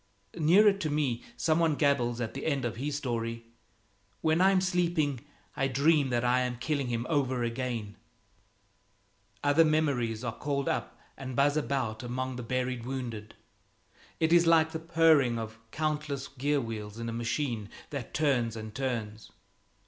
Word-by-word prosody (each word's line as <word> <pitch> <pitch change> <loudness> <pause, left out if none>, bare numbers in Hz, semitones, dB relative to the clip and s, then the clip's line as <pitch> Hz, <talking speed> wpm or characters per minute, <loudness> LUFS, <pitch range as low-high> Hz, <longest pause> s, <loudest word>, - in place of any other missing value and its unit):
Nearer 195 +7 +5
to 195 -6 -3
me 145 -6 0
some 160 0 +2
one 165 -3 +3
gabbles 130 -5 +1
at 115 -2 -3
the 135 - -4
end 140 -5 0
of 115 -2 -3
his 145 +3 -2
story, 115 -4 -3 0.8
"When 160 +2 +2
I'm 190 0 +5
sleeping 175 -7 +1 0.4
I 135 - +1
dream 140 +2 +3
that 120 -1 0
I'm 125 0 +1
killing 140 +1 -1
him 120 0 -2
over 130 -5 0
again!" 115 -3 -3 1.5
Other 145 +3 +5
memories 140 -8 +1
are 120 -2 -3
called 140 -1 -2
up - - -2 0.2
and 130 -2 -6
buzz 140 +2 +3
about 130 -7 -1
among 130 +1 -3
the 125 - -5
buried 125 0 -2
wounded; 120 -4 -5 0.8
it 160 +1 +3
is 170 -1 +5
like 160 -1 +5
the 160 - -4
purring 160 -7 +4
of 110 0 -6
countless 150 0 -2
gear 145 +2 0
wheels 110 -3 -6
in 115 0 -4
a 115 - -3
machine 115 -2 -2 0.2
that 140 -5 -5
turns 125 -7 +1
and 110 -1 -7
turns. 115 -4 -4
130 Hz, 155 wpm, -29 LUFS, 120-150 Hz, 1.5 s, Nearer